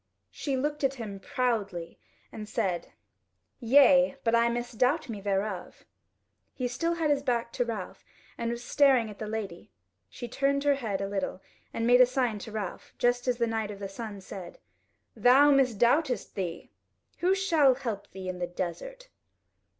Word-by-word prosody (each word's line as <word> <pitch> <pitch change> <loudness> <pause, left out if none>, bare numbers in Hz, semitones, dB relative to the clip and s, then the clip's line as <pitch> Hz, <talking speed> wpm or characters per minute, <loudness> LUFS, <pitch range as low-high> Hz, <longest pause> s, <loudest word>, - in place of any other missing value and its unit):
She 275 -3 -2
looked 295 +2 -2
at 270 0 +1
him 210 -6 -7
proudly 200 -8 -2 0.3
and 210 -1 -8
said: 190 -7 -2 0.7
"Yea, 270 +2 +5
but 230 - +1
I 235 0 +4
misdoubt 245 +4 0
me 210 -3 -5
thereof." 195 -1 -3 0.7
He 255 - -1
still 330 +8 -1
had 320 -3 +1
his 285 -1 +2
back 235 -3 -1
to 245 - 0
Ralph 220 -6 -6 0.3
and 235 - -3
was 235 +1 -4
staring 255 -4 +3
at 205 - -13
the 215 - -4
lady; 210 -5 -5 0.4
she 240 - -7
turned 280 +3 0
her 290 -1 +4
head 220 -8 -3
a 195 - -2
little 195 -2 -3 0.3
and 230 - -2
made 245 +1 +6
a 250 - +7
sign 250 -4 0
to 220 - -8
Ralph, 210 -4 -6
just 245 +1 +1
as 250 -1 +1
the 235 - +2
Knight 225 -2 -2
of 205 - -7
the 200 0 -5
Sun 205 0 -7
said: 185 -2 -9 0.6
"Thou 275 +4 +6
misdoubtest 255 +1 +2
thee? 175 -4 -5 0.5
Who 370 +2 +3
shall 320 -9 +4
help 230 -7 -5
thee 190 -1 -8
in 185 -1 -4
the 175 - -2
desert?" 345 - -6
235 Hz, 170 wpm, -28 LUFS, 205-270 Hz, 0.7 s, a